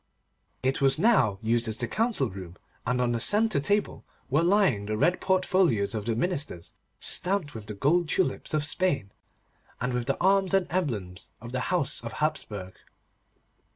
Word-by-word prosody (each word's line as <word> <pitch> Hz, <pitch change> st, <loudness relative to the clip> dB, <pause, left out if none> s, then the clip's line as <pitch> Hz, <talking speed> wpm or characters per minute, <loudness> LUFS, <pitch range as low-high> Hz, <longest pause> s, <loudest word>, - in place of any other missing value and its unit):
It 130 Hz, +1 st, 0 dB
was 135 Hz, +1 st, +5 dB
now 165 Hz, -, +3 dB
used 115 Hz, +1 st, +1 dB
as 110 Hz, -1 st, -2 dB
the 120 Hz, -, -2 dB
council 220 Hz, -, 0 dB
room, 90 Hz, -2 st, -9 dB, 0.3 s
and 125 Hz, +1 st, 0 dB
on 125 Hz, -1 st, +1 dB
the 120 Hz, -, -1 dB
centre 210 Hz, -, +4 dB
table 205 Hz, +8 st, -1 dB, 0.3 s
were 150 Hz, +4 st, +3 dB
lying 170 Hz, -, +2 dB
the 110 Hz, 0 st, -2 dB
red 175 Hz, +10 st, +2 dB
portfolios 185 Hz, -, +2 dB
of 105 Hz, -2 st, -4 dB
the 115 Hz, -, 0 dB
ministers, 140 Hz, -, -3 dB, 0.3 s
stamped 180 Hz, -5 st, -1 dB
with 110 Hz, -2 st, -9 dB
the 105 Hz, -, -5 dB
gold 155 Hz, -, +1 dB
tulips 180 Hz, -3 st, -1 dB
of 150 Hz, -1 st, +1 dB
Spain, 145 Hz, -, 0 dB, 0.7 s
and 125 Hz, +1 st, -2 dB
with 125 Hz, 0 st, -2 dB
the -, -, 0 dB
arms 195 Hz, +1 st, +3 dB
and 190 Hz, -2 st, +2 dB
emblems 110 Hz, -, -3 dB
of 115 Hz, +1 st, -9 dB
the 130 Hz, -, -2 dB
house 175 Hz, -7 st, 0 dB
of 115 Hz, -, -6 dB
Hapsburg. 105 Hz, -12 st, -3 dB
140 Hz, 170 wpm, -27 LUFS, 110-185 Hz, 0.7 s, was